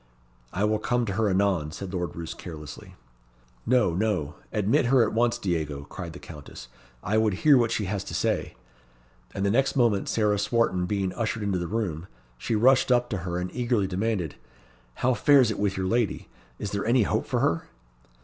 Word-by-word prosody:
"I 100 - -1
will 105 0 +2
come 120 +2 0
to 100 - -3
her 110 0 +1
anon," 95 -5 +1
said 95 +2 -7
Lord 90 -4 -3
Roos 85 -1 -5
carelessly. 75 -4 -10 0.7
"No, 120 -7 +3
no; 90 -7 -1 0.2
admit 105 +3 +2
her 130 -1 +5
at - - -1
once, 115 +1 +2
Diego," 80 -6 -2
cried 85 -4 -6
the - - -9
Countess; 75 -6 -11 0.3
"I 105 +4 +1
would 110 -3 +2
hear 150 -2 +8
what 120 -3 +3
she 110 -2 -1
has 100 +1 -2
to - - -6
say." - - -1 0.8
And 100 - -1
the 100 - +2
next 135 +6 +2
moment 115 -6 +2
Sarah 105 -2 +1
Swarton 100 -4 +1
being 100 -2 -1
ushered 110 -2 -2
into 100 -3 0
the 85 - -3
room, 95 -5 -3 0.3
she 115 - -1
rushed 130 +4 +4
up 120 0 +2
to 105 - -1
her 90 0 -4
and 90 0 -3
eagerly 120 -4 +1
demanded, 95 -3 -2 0.6
"How 130 +1 +1
fares 130 0 +5
it 105 - -4
with 100 -2 0
your 95 - -1
lady? 115 +2 -1 0.3
Is 100 - -5
there 100 0 -2
any 120 +1 +3
hope - - -1
for - - 0
her?" - - +1
105 Hz, 195 wpm, -26 LUFS, 90-115 Hz, 0.8 s, hear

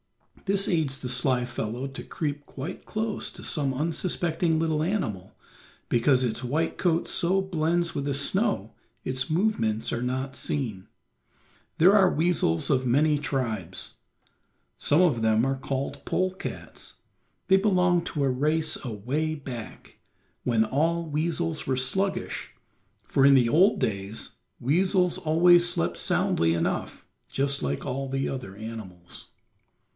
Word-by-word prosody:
This 200 0 +1
aids 155 -6 0
the 125 - -5
sly 125 0 +1
fellow 120 +1 -4
to 135 - -8
creep 145 -2 -4
quite 140 +6 -7
close 215 0 -2
to - - -12
some 140 -4 0
unsuspecting 165 +2 0
little 160 -2 0
animal, 110 - -2 0.5
because 125 +2 +3
its 120 0 -2
white 155 +7 -1
coat 170 -2 +1
so 185 +2 +2
blends 170 -2 0
with 140 - -1
the 140 -1 0
snow 165 - +1 0.3
its 130 0 -2
movements 155 - 0
are 115 - -2
not 130 +2 -2
seen. 115 -13 -3 0.9
There 185 +5 +6
are 190 -3 +5
weasels 155 - +1
of 130 -2 +2
many 150 +5 +3
tribes; 110 - -3 0.8
some 150 +4 +3
of 150 -11 +3
them 110 +1 +3
are 135 0 0
called 135 +1 -4
pole 185 0 0
cats. 185 - -8 0.5
They 190 - +6
belong 180 -3 +3
to 145 - -2
a 135 - +2
race 155 +5 0
away 135 +7 -2
back, 130 -6 -9 0.4
when 115 -2 +2
all 165 +7 0
weasels 165 +1 -2
were 130 -1 +1
sluggish, 190 +9 -2 0.5
for 135 +5 +1
in 140 0 +7
the 125 -3 +4
old 180 - +4
days 100 0 -3 0.3
weasels 180 - +2
always 175 +1 +5
slept 85 - -1
soundly 80 0 +1
enough, 85 - -2 0.2
just 140 0 0
like 70 0 -2
all 135 0 -3 0.2
other 125 -8 -5
animals. 105 -6 -9
140 Hz, 135 wpm, -26 LUFS, 125-170 Hz, 0.9 s, in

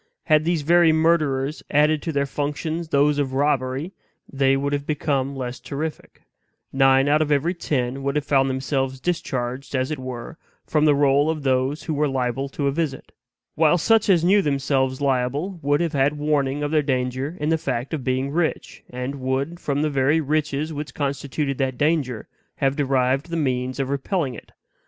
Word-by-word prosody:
Had 155 -1 +3
these 170 -3 0
very 170 +1 +5
murderers 155 -3 +1
added 150 +1 +3
to 165 - -3
their 140 -2 0
functions 150 +4 -3
those 145 0 +2
of 135 -2 -1
robbery, 135 +2 0 0.4
they 135 -1 +2
would 140 +1 -1
have 145 0 -2
become 140 -3 -1
less 125 -1 -5
terrific; 155 +2 -6 0.5
nine 135 0 +4
out 150 +2 +3
of 150 -1 0
every 150 +5 +2
ten 135 -6 -2
would 140 +1 -2
have 150 -1 0
found 135 -2 +2
themselves 135 0 -2
discharged, 130 -5 -3
as 130 +2 0
it 150 - -3
were, 130 +4 -7 0.3
from 155 -1 +2
the 150 -2 +5
roll 140 +1 +3
of 155 -2 -2
those 130 +2 0
who 160 - -3
were 150 0 +1
liable 135 0 -2
to 140 +1 -3
a 140 - +2
visit; 145 -2 -3 0.4
while 160 +2 +3
such 220 +5 +3
as 175 -4 +4
knew 200 +4 +5
themselves 135 -3 0
liable 140 +7 -1
would 145 +1 +1
have 170 -2 -1
had 140 +1 +1
warning 145 -1 0
of 145 - -2
their 155 -1 +3
danger 130 +3 -2
in 150 +1 -1
the 165 - +3
fact 130 0 -3
of 150 -5 -3
being 130 +2 -1
rich; 160 +1 -2
and 125 +2 -5
would, 135 +6 -2
from 145 -2 -1
the 155 - +1
very 140 +3 +2
riches 155 0 -1
which 150 0 -6
constituted 140 0 -2
that 130 -2 -1
danger, 145 -7 0 0.3
have 135 0 0
derived 135 +1 +1
the 170 - -2
means 130 -3 -1
of 135 0 -1
repelling 140 0 -1
it. - - -12
140 Hz, 185 wpm, -23 LUFS, 135-155 Hz, 0.5 s, very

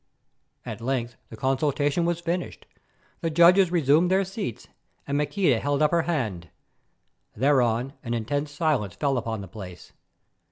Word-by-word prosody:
At - - -6
length 120 -1 -2
the 110 - -10
consultation 145 +5 0
was 170 0 0
finished; 175 +1 -4 0.5
the 165 - -1
judges 175 +3 +5
resumed 165 +1 +3
their 190 +1 +2
seats, 190 - -6 0.4
and 140 - -2
Maqueda 150 - +1
held 145 +3 0
up 150 - +3
her 170 -1 +3
hand. 105 - -2 0.9
Thereon 125 0 +2
an 120 -3 -3
intense 145 +6 -2
silence 145 - -1
fell 135 +7 0
upon 115 -3 -3
the 95 - -8
place. 90 -3 -10
140 Hz, 145 wpm, -25 LUFS, 115-170 Hz, 0.9 s, judges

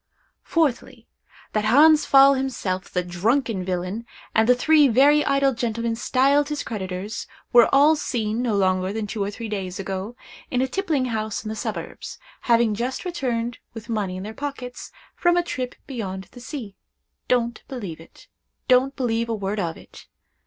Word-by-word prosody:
Fourthly, 315 -7 -1 0.5
That 215 -1 0
Hans 300 +7 +6
Pfaall 275 0 +7
himself, 230 -9 -3
the 180 - -1
drunken 205 +4 0
villain, 185 +5 -3 0.3
and 220 +2 +3
the 250 - +7
three 300 +3 +5
very 280 +5 +5
idle 275 -1 +2
gentlemen 230 -1 -2
styled 275 +5 +2
his 295 -1 -3
creditors, 195 0 -5 0.3
were 240 -1 +7
all 290 +3 +6
seen, 230 -6 -2
no 235 -4 0
longer 185 -1 +1
than 220 +1 -3
two 210 +1 -4
or 200 - -2
three 225 +2 -6
days 190 -3 -4
ago, 195 +4 -4 0.3
in 250 - 0
a 260 - +2
tippling 315 -4 -1
house 220 -3 -3
in - - -3
the 220 - -4
suburbs, - - -6 0.3
having 230 -2 +4
just 245 - -3
returned, 245 -9 -2 0.2
with 225 +1 -9
money 200 -5 -2
in 185 - -6
their 215 +2 -6
pockets, 255 -1 -6 0.2
from 350 0 +2
a 350 - +3
trip 255 -7 -4
beyond 195 -7 -6
the 245 - -12
sea. 240 -7 -7 0.5
Don't 235 -2 0
believe 200 -12 -6
it—don't 255 +9 -2
believe 230 -3 -1
a 225 - 0
word 205 0 -3
of 165 -4 -2
it. - - -15
235 Hz, 165 wpm, -23 LUFS, 205-270 Hz, 0.5 s, Pfaall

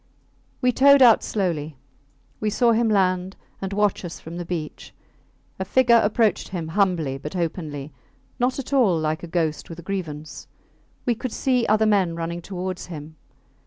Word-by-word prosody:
We 250 -1 +3
towed 280 +2 +6
out 235 -3 +7
slowly. 160 -8 -2 0.6
We 215 - 0
saw 235 +3 +3
him 230 0 +2
land 185 -2 +1 0.3
and 195 0 -3
watch 205 -1 +1
us 175 -2 -7
from 165 +2 -9
the 175 - -5
beach. 165 -3 -6 0.6
A - - 0
figure 235 +3 +4
approached 215 +1 +1
him 170 -4 -5
humbly 165 -7 0
but 150 +5 -7
openly 155 -5 -4 0.5
not 250 +1 +1
at 275 0 -5
all 225 -11 +4
like 155 0 -1
a 175 - -7
ghost 165 -2 -2
with 165 - -8
a 170 - -10
grievance. 155 -6 -6 0.6
We 245 - +2
could 250 +1 -5
see 250 -1 +1
other 215 +1 +3
men 195 -6 +2
running 170 +1 -4
towards 185 0 -5
him. 155 -2 -9
185 Hz, 165 wpm, -23 LUFS, 165-220 Hz, 0.6 s, out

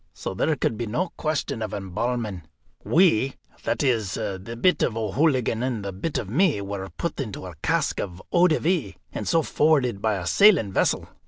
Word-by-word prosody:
So - - -5
there 150 +11 +1
could 115 -4 -1
be 120 - -3
no 165 - -1
question 155 -6 -2
of 110 -2 -3
embalming. 105 +1 -3 0.4
We, 145 - +3 0.3
that - - 0
is, 115 -8 +1
the 100 +4 -5
bit 180 +7 +3
of 115 - 0
O'Hooligan 120 +1 +1
and 120 -5 -2
the 100 - -3
bit 120 - -3
of 120 -6 -3
me, 150 - +2
were 100 -1 -5
put 170 - -4
into 110 -8 -5
a 90 - -8
cask - - 0
of 90 -3 -4
eau 175 +1 +5
de 155 - +2
vie, 175 +1 0 0.2
and - - -4
so 165 -1 +3
forwarded 140 -11 +2
by 110 -1 +1
a 90 -2 -4
sailing 160 - +5
vessel. - - +1
120 Hz, 190 wpm, -25 LUFS, 100-155 Hz, 0.4 s, eau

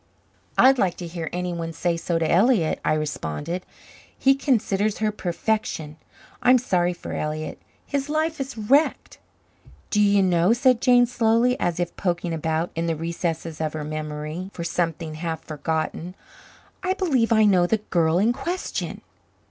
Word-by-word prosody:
"I'd 265 0 +6
like 180 -5 +1
to 175 - -6
hear 165 -1 -5
anyone 175 -2 -3
say 170 +2 0
so 165 0 -1
to 165 -1 0
Elliott," 185 -1 +3
I - - +2
responded. 155 - -3 0.5
"He 270 - +5
considers 215 -7 0
her 215 -1 0
perfection. 180 -5 -2 0.4
I'm 250 +1 +6
sorry 180 -8 +1
for 175 - -7
Elliott. 155 +1 -4 0.2
His 280 0 -2
life 315 +1 0
is 270 -2 -5
wrecked." 275 +9 +1 0.7
"Do 210 - +3
you 200 -1 +4
know," 180 +2 +3
said 250 -1 +3
Jane 245 -1 +5
slowly, 235 0 +2
as 175 0 -1
if 175 -1 -2
poking 175 -2 -1
about 160 +1 -1
in 165 +1 -1
the 165 - 0
recesses 165 0 -3
of 155 -1 -1
her 155 -1 -4
memory 155 +3 -5
for 170 - -4
something 165 -2 -2
half 160 0 -4
forgotten. 160 +3 -3 0.7
"I 375 0 0
believe 270 -12 +1
I 220 -1 +5
know 185 -4 +4
the 220 - +2
the 210 - -23
girl 165 -1 +3
in 220 +6 +3
question." 350 +8 -4
180 Hz, 160 wpm, -24 LUFS, 165-230 Hz, 0.7 s, I'd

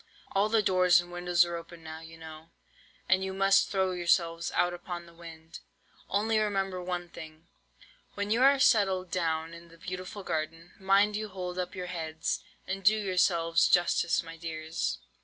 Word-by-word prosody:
All 200 +2 +2
the 220 -1 +3
doors 180 -2 +5
and 175 0 -6
windows 175 0 +2
are 170 0 -4
open 170 0 -10
now, 160 0 -8
you 165 0 -12
know, 160 0 -11 0.6
and 190 0 +3
you 190 0 -4
must 195 0 +4
throw 190 -2 +1
yourselves 170 -1 +1
out 175 0 +2
upon 175 0 -7
the 170 - -16
wind. 165 -1 -11 0.5
Only 215 +2 +1
remember 195 -3 -1
one 180 -1 -4
thing, 160 0 -12 0.7
when 205 0 -3
you 230 +3 +2
are 275 +1 +6
settled 190 -8 +3
down 165 -2 -1
in 170 0 -12
the 165 0 -17
beautiful 185 +3 -7
garden, 165 +1 -4
mind 200 +2 +3
you 215 0 -3
hold 180 -1 -5
up 180 0 -4
your 180 -1 -4
heads, 160 -3 -3 0.2
and 195 +1 -4
do 215 +3 +5
yourselves 180 -4 +2
justice, 175 -1 +2
my 165 0 -10
dears. 160 -1 -3
175 Hz, 175 wpm, -29 LUFS, 165-195 Hz, 0.7 s, are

